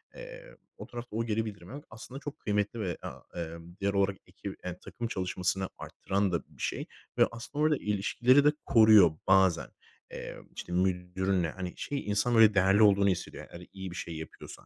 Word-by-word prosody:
Eee, - - -10 0.2
o - - -9
tarafta 120 -2 -8
o 115 - 0
geri 110 0 0
bildirimi 100 -2 -8
almak 145 +2 -9
aslında 120 +4 -9
çok 145 0 -7
kıymetli 105 +2 -1
ve, 90 -6 -2
aaa, - - -8 0.2
emm, 85 +1 -8
diğer 100 0 +1
o 100 0 +3 0.2
ekip, - - -9
emm, 90 - -3
takım 120 -1 -5
çalışmasını 95 -1 -1
arttıran 100 -1 -2
da 85 - 0
bir - - -16
şey. - - -2 0.3
Ve - - +6
aslında 130 +6 -4
orada 155 -2 +3
ilişkileri 120 +7 +3
de 150 - +7
koruyor 110 -7 +7 0.2
bazen. 95 -2 +4 0.4
Eee, - - -7 0.2
işte, 90 - -6
müdürünle 90 -1 0
hani, 90 -1 -6
şey, 140 -1 -4
insan 105 +4 +1
böyle 110 -2 +7
değerli 95 +2 +4
olduğunu 100 -1 +5
hissediyor. 90 - -4
Hani, 90 +1 -10
iyi 95 -2 -6
bir 85 - -8
şey 85 -1 -5
yapıyorsa. 80 - -10
100 Hz, 185 wpm, -30 LUFS, 90-115 Hz, 0.4 s, de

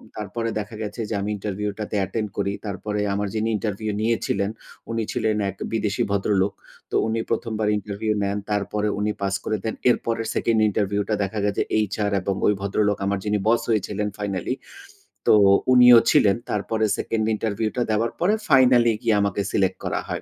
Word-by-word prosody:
তারপরে 110 +2 -3
দেখা 105 +2 -6
গেছে 105 +2 -5
যে, - - -2
আমি 100 - -2
ইন্টারভিউটাতে 105 +1 -4
অ্যাটেন্ড 105 +2 -2
করি। 100 - 0
তারপরে 105 +1 -3
আমার 100 0 -1
যিনি 110 +1 0
ইন্টারভিউ 105 +1 -3
নিয়েছিলেন, 110 -3 0 0.4
উনি 115 -1 -1
ছিলেন 110 -1 0
এক 95 - -7 0.2
বিদেশি 105 -2 0
ভদ্রলোক। 100 -1 +1 0.4
তো - - -2
উনি 115 +1 -1
প্রথমবার 110 -2 -1
ইন্টারভিউ 105 +2 -2
নেন, 100 +1 -1
তারপরে 105 +1 -1
উনি 105 +1 0
পাস 100 0 0
করে 110 - -1
দেন। 110 - -2 0.2
এরপরে 115 -1 0
সেকেন্ড 115 -1 +2
ইন্টারভিউ 100 0 0
টা 110 - +2
দেখা 100 +2 -3
গেছে, 100 - 0 0.2
এইচআর 105 0 0
এবং 95 +1 -1
ওই 105 - +4
ভদ্রলোক 100 +1 +1
আমার 100 0 0
যিনি 105 0 +1
বস 115 +1 +4
হয়েছিলেন 105 -1 0
ফাইনালি। 100 +1 -2 0.7
তো - - +7 0.4
উনিও 125 -1 +9
ছিলেন। 100 -2 +5 0.2
তারপরে 110 +2 0
সেকেন্ড 110 -1 -1
ইন্টারভিউ 110 0 -1
টা - - +1
দেওয়ার 115 +2 +1
পরে 185 +5 +3 0.2
ফাইনালে 125 -3 +6
গিয়ে 115 -2 +2
আমাকে 100 0 0
সিলেক্ট 95 -2 +1
করা - - -1
হয়। - - -3
105 Hz, 170 wpm, -23 LUFS, 100-110 Hz, 0.7 s, উনিও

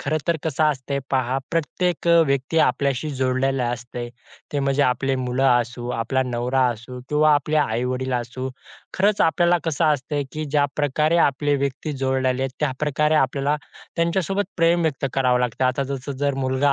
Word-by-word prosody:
खरं 155 - -1
तर 170 -1 +2
कसं 155 -1 +1
असते 140 -2 -1
पहा, 130 -1 +1
प्रत्येक 170 +1 -1
अ, - - +6 0.2
व्यक्ती 135 +3 0
आपल्याशी 140 -1 +1
जोडलेली 130 0 0
असते. 120 0 -4 0.4
ते 145 - 0
म्हणजे 140 +1 +1
आपले 135 +1 +1
मुलं 125 +1 -1
असू, 120 0 0
आपला 125 +3 0
नवरा 125 +1 0
असू 120 +3 -10
किंवा 150 0 +4
आपले 150 +2 0
आई-वडील 125 0 0
असू. 125 +2 -3 0.5
खरंच 200 +2 +2
आपल्याला 175 +1 +3
कसं 165 -1 0
असते, 145 -1 0
की 155 0 -3
ज्या 145 0 +1
प्रकारे 150 +3 +1
आपले 145 +1 +1
व्यक्ती 140 +3 -2
जोडलेले 130 -1 0
आहेत 135 - -1
त्या 150 -3 +1
प्रकारे 150 +1 +1
आपल्याला 140 +1 +1 0.4
त्यांच्यासोबत 185 +4 0
प्रेम 170 0 +3
व्यक्त 145 -4 -1
करावं 125 -2 +2
लागते. 125 +1 -1
आता 130 +2 +1
जसं 140 +1 -4
जर 140 -1 +1
मुलगा 130 +2 +2
135 Hz, 165 wpm, -22 LUFS, 130-150 Hz, 0.5 s, अ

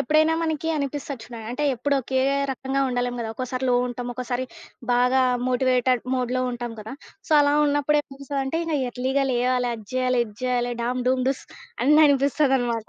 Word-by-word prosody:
ఎప్పుడైనా 310 +4 +3
మనకి 320 0 -1
అనిపిస్తది 280 -3 -4
చూడండి, 230 -3 -9
అంటే 275 +5 -2
ఎప్పుడోకే 265 0 0 0.3
రకంగా 265 +1 -2
ఉండలేం 245 0 -1
గదా! 220 -1 -3
ఒక్కోసారి 255 +1 -3
లో 250 - +3
ఉంటాం. 245 0 -5
ఒక్కోసారి 250 +1 -3 0.5
బాగా 250 +2 +3 0.3
మోటివేటెడ్ 255 -1 +2
మోడ్‌లో 255 0 -1
ఉంటాం 240 -1 -5
గదా! 220 +3 -8 0.4
సో, - - 0
అలా 285 0 +3
ఉన్నప్పుడేమనిపిస్తాదంటే, 285 0 -1
ఇంక 320 -2 -1
ఎర్లీగా 265 +3 0
లేవాలి, 250 0 +1
అది 220 -2 -11
జేయాలి, 255 -1 +1
ఇది 210 - -13
జేయాలి 245 -1 0
డామ్, 250 +1 -1
డూమ్, 255 -1 +1
డూస్ 270 - -2 0.4
అని 300 +4 +5
అనిపిస్తుందనమాట. 270 -5 +1
255 Hz, 155 wpm, -24 LUFS, 245-280 Hz, 0.5 s, అని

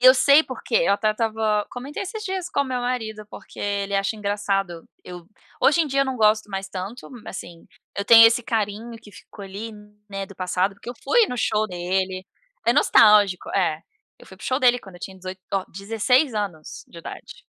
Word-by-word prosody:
Eu 255 +1 +8
sei 285 +4 +6
porque. 255 -3 -7
Eu 250 -5 +4
até 215 +1 +1
estava 215 -1 0
comentei 270 +8 -6
esses 425 +3 -6
dias 375 -2 -4
com - - 0
o - - +1
meu 255 -1 -3
marido, 225 -4 -3
porque - - -13
ele 200 0 -2
acha 195 +2 0
engraçado 195 -4 -2 0.2
eu 175 -2 -10 0.3
hoje 310 +4 +4
em 320 - +1
dia, 275 -1 0
eu - - -1
não 265 -1 -3
gosto 215 -1 +2
mais 195 0 -4
tanto 195 +6 -7
m 245 -4 -12
assim, 170 -2 -9 0.3
eu 200 - -2
tenho 225 +1 +9
esse 235 +2 +2
carinho 220 0 -2
que 215 -2 -15
ficou 205 +1 -13
ali, 205 +4 -7 0.4
né, 195 0 -4
do 195 - -13
passado, 185 +2 -1
porque 220 - -9
eu - - -8
fui 450 - +4
no 250 - -5
show 215 -1 +1
dele. 185 +1 -2 0.4
É 235 - +5
nostálgico 210 -8 +5
É. 170 -5 +1 0.4
Eu - - -17
fui - - -13
para - - -17
o - - -4
show 255 - +1
dele 245 -2 +4
quando 195 -5 -14
eu - - -17
tinha 190 - -7
18, 185 0 -8
oh, 195 -1 0
16 225 - +1
anos 190 -7 -5
de 170 - -12
idade, - - -10
210 Hz, 210 wpm, -23 LUFS, 195-245 Hz, 0.4 s, tenho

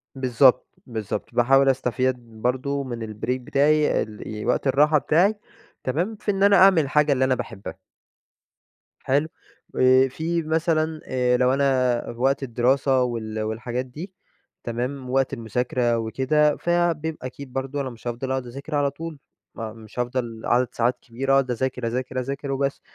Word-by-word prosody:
بالضبط، 130 0 +4 0.2
بالضبط، 110 -5 -5
باحاول 135 +3 +4
أستفيد 130 0 +1 0.2
برضو 135 +3 -1
من 120 -3 -5
البريك 110 +4 -3
بتاعي 150 +4 +2
ال 105 0 -7
وقت 125 - 0
الراحة 150 +3 +4
بتاعي، 175 - +3 0.5
تمام 170 - -1
في 205 - -3
إن 195 0 -1
أنا 200 0 +6
أعمل 190 -2 +7
الحاجة 150 +1 +2
اللي 130 -1 +2
أنا 130 -1 +2
باحبها. 100 -5 -7 1.2
حلو، 145 +4 +1 0.5
آآ، 130 +1 +5
في 165 +5 -2
مثلًا 160 0 0
آآ، 125 -1 +1
لو 125 +1 +3
أنا 130 -3 +2
في 115 - -14
وقت 135 +1 +2
الدراسة 130 +1 +2
وال 110 -3 -3
والحاجات 120 +3 -3
دي 160 +10 -9 0.5
تمام، 125 +3 -4
وقت 135 +1 +1
المذاكرة 120 0 -1
وكده 135 +6 +1
فبيبقى 165 -5 -1
أكيد 130 0 -9
برضو 135 +2 -3
أنا 130 -2 -3
مش 120 0 -14
هافضل 120 +3 -4
أقعد 130 -2 -2
أذاكر 140 +5 -8
على 145 -1 +2
طول، 160 +1 -8 0.4
مش 110 0 -8
هافضل 120 -2 -3
عدد 125 0 +2
ساعات 120 +1 0
كبيرة 135 +3 -2
أقعد 135 -2 +3
أذاكر، 125 0 -2
أذاكر، 130 +2 -2
أذاكر 140 +2 -4
وبس 135 0 -1
130 Hz, 150 wpm, -24 LUFS, 120-145 Hz, 1.2 s, أعمل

